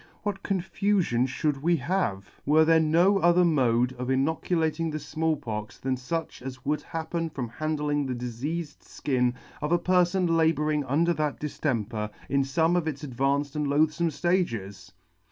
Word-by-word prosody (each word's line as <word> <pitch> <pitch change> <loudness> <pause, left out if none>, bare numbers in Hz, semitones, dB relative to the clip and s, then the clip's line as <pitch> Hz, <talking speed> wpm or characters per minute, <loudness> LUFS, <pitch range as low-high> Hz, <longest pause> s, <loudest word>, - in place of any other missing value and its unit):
What 205 -2 -3
con 195 -2 -1
fufion 185 - +1
fhould 140 +1 -1
we 170 +3 +3
have, 130 - -1 0.2
were 155 +2 +4
there 165 0 +5
no 170 +6 +4
other 175 0 +4
mode 125 -6 +2
of 125 0 -3
inoculating 160 +3 0
the 155 - -3
Small 155 +1 -1
Pox 110 -6 -6
than 130 0 -1
fuch 160 +6 -4
as 130 0 -8
would 150 0 0
happen 165 +1 -3
from 135 -5 -4
handling 150 +1 -1
the 130 - -2
difeafed 135 +7 -6
{kin 125 -3 +2 0.3
of 150 - -2
a 175 - +5
perfon 180 +1 +2
labouring 155 -2 +2
under 160 +6 +2
that 150 -3 -2
diftemper 115 -8 -2 0.2
in 140 - +2
fome 160 +6 +1
of 175 -3 0
its 145 -2 -4
advanced 140 +2 -1
and 150 -1 0
loathfome 155 +4 +2
ftages 115 - -1
150 Hz, 160 wpm, -27 LUFS, 130-165 Hz, 0.3 s, there